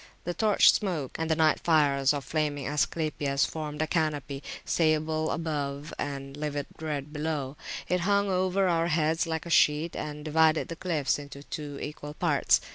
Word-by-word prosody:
The 175 - -2
torch 215 +1 +5
smoke 170 - -2
and 160 0 -1
the 160 - +3
night 155 -1 +3
fires 140 -4 +3
of 145 -2 -3
flaming 150 -3 -1
Asclepias 145 -1 0
formed 155 -1 -3
a - - +1
canopy, 150 -4 -1 0.2
sable 155 -1 +1
[p.146] - - 0
above 150 -2 -3
and 135 -1 -4
livid 145 -1 -3
red 150 -2 -4
below; 150 -3 -2 0.3
it 180 +1 +1
hung 200 +3 +2
over 185 0 +1
our 170 -1 +2
heads 160 0 +1
like 160 0 -3
a 170 - -6
sheet, 150 +2 +3
and 150 0 -5
divided 160 +1 +3
the 165 - -4
cliffs 160 -6 0
into 140 -1 -9
two 145 -1 -6
equal 150 0 -7
parts. - - +3
155 Hz, 170 wpm, -28 LUFS, 145-165 Hz, 0.3 s, torch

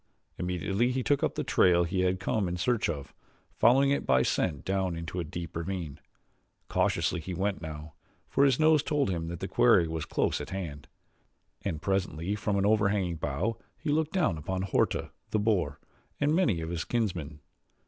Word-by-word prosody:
Immediately 95 +7 0
he 130 0 -1
took 145 +1 +2
up - - 0
the - - -1
trail 85 -1 +4
he 90 +2 -2
had 90 0 +1
come 100 +1 0
in 90 0 -3
search 115 +4 +1
of, 70 -5 -5 0.5
following 135 +4 +5
it 140 - +1
by 65 0 +3
scent 75 0 -1
down 95 -2 0
into 85 +2 -5
a - - -1
deep 85 +1 -7
ravine. 85 -4 -4 0.7
Cautiously 90 - +1
he 90 +3 -5
went 95 +1 -1
now, 75 -1 -7 0.3
for 140 - +2
his 135 -3 +4
nose 155 -1 +5
told 145 -8 0
him 85 -2 -2
that 85 0 -6
the 95 - -2
quarry 115 -9 +4
was 80 -1 -3
close - - 0
at - - -7
hand, 80 -7 -6 0.7
and 85 -4 -4
presently 95 -2 -1
from 105 -1 -1
an 100 - +2
overhanging 100 -5 +2
bough 75 +10 -2 0.2
he 150 - -2
looked 155 +1 +1
down 155 - +1
upon 95 +5 -3
Horta, 95 - 0 0.2
the - - 0
boar, 95 -9 +1 0.4
and 145 +2 +2
many 140 - +2
of 80 +1 -4
his 85 -2 -2
kinsmen. 90 -11 -2
95 Hz, 185 wpm, -29 LUFS, 85-110 Hz, 0.7 s, following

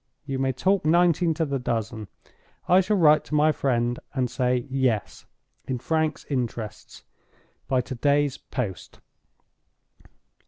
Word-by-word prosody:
You 135 -2 -3
may 135 0 +1
talk 190 +10 +1
nineteen 170 +1 +3
to 160 - 0
the 140 -2 -2
dozen—I 115 - -2
shall 205 +3 0
write 155 -3 +5
to 150 - -3
my 150 +1 +4
friend 120 -4 0 0.2
and 125 -2 0
say 125 -1 0
Yes, 130 -6 -1 0.4
in 130 - -2
Frank's 155 +3 -1
interests, 120 -5 -5 0.6
by 130 -1 +2
to 130 - -7
day's 145 +2 +1
post." 105 - -6
135 Hz, 125 wpm, -25 LUFS, 125-155 Hz, 0.6 s, write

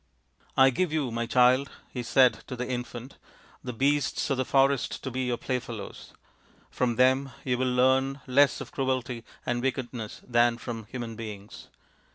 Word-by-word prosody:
" - - -44
c - - -33
I 135 0 +7
give 180 +5 0
you, 150 -6 -1
my 115 0 -2
child/ 125 +3 +4 0.2
he 125 - -4
said 120 0 +4
to 130 - -5
the 125 0 -4
infant, 125 0 -6 0.2
' - - -27
the 125 - -4
beasts 140 +4 0
of 135 - +1
the 130 - +1
forest 135 0 +2
to 130 - -4
be 130 +1 -2
your 120 -1 -1
playfellows: 120 -5 -5 0.6
from 120 -2 0
them 130 +2 +3
you 125 -2 0
will 130 -1 +1
learn 130 +2 +2
less 140 +2 +3
of - - -8
cruelty 130 -3 -2 0.2
and 120 0 -1
wickedness 125 -4 -4
than 120 -1 +3
from 115 -2 -6
human 115 0 -6
beings. 105 -3 -9
125 Hz, 180 wpm, -27 LUFS, 120-135 Hz, 0.6 s, I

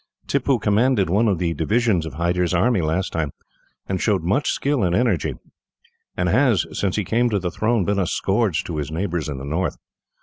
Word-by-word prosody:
Tippoo 140 -1 +1
commanded 105 -2 +2
one 110 +5 +3
of 100 -4 +2
the 85 -1 -1
divisions 95 +1 +1
of 70 - -8
Hyder's 90 +2 0
army, 110 +2 +2
last 80 +4 -1
time, 80 -4 -2 0.5
and 95 -2 -2
showed 100 -6 +1
much 115 - +1
skill 140 -3 0
and 90 -1 +1
energy; 120 +2 +1 0.8
and - - 0
has, 125 -9 +3
since 95 -2 -1
he 105 - 0
came 120 +6 +1
to 105 - 0
the 90 -2 -2
throne, 110 0 0
been 100 +1 0
a 90 - 0
scourge 100 -3 0
to 85 - -5
his 75 -1 -3
neighbours 85 -1 -2
in 70 - -4
the 65 - -7
north. 85 +6 -2
95 Hz, 200 wpm, -22 LUFS, 85-115 Hz, 0.8 s, one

